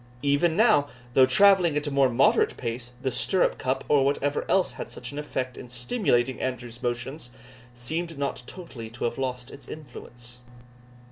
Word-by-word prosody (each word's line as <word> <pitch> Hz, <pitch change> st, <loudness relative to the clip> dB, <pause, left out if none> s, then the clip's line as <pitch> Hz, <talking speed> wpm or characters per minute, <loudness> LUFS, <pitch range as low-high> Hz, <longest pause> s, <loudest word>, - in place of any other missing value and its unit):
Even 145 Hz, +4 st, +2 dB
now, 215 Hz, -10 st, +5 dB, 0.3 s
though 130 Hz, 0 st, +6 dB
travelling 180 Hz, +1 st, +5 dB
at 150 Hz, -, -1 dB
a 145 Hz, -, -2 dB
more 140 Hz, -1 st, +4 dB
moderate 120 Hz, +2 st, +3 dB
pace, 120 Hz, 0 st, -4 dB
the 130 Hz, -, 0 dB
stirrup 185 Hz, +8 st, +1 dB
cup, 130 Hz, +1 st, -1 dB
or 145 Hz, -2 st, +4 dB
whatever 140 Hz, +1 st, 0 dB
else 190 Hz, -1 st, +3 dB
had -, -, -7 dB
such 125 Hz, +1 st, -7 dB
an 145 Hz, -, -5 dB
effect 130 Hz, -4 st, -4 dB
in 125 Hz, -, -9 dB
stimulating 125 Hz, -, 0 dB
Andrew's 120 Hz, -2 st, -4 dB
motions, 120 Hz, +3 st, -3 dB, 0.5 s
seemed 160 Hz, +7 st, -4 dB
not 140 Hz, -3 st, -2 dB
totally 130 Hz, -11 st, -8 dB
to 120 Hz, +2 st, -8 dB
have 120 Hz, -, -1 dB
lost 125 Hz, -2 st, -3 dB
its 140 Hz, -, -12 dB
influence. 125 Hz, -4 st, -10 dB
135 Hz, 165 wpm, -26 LUFS, 120-150 Hz, 0.5 s, though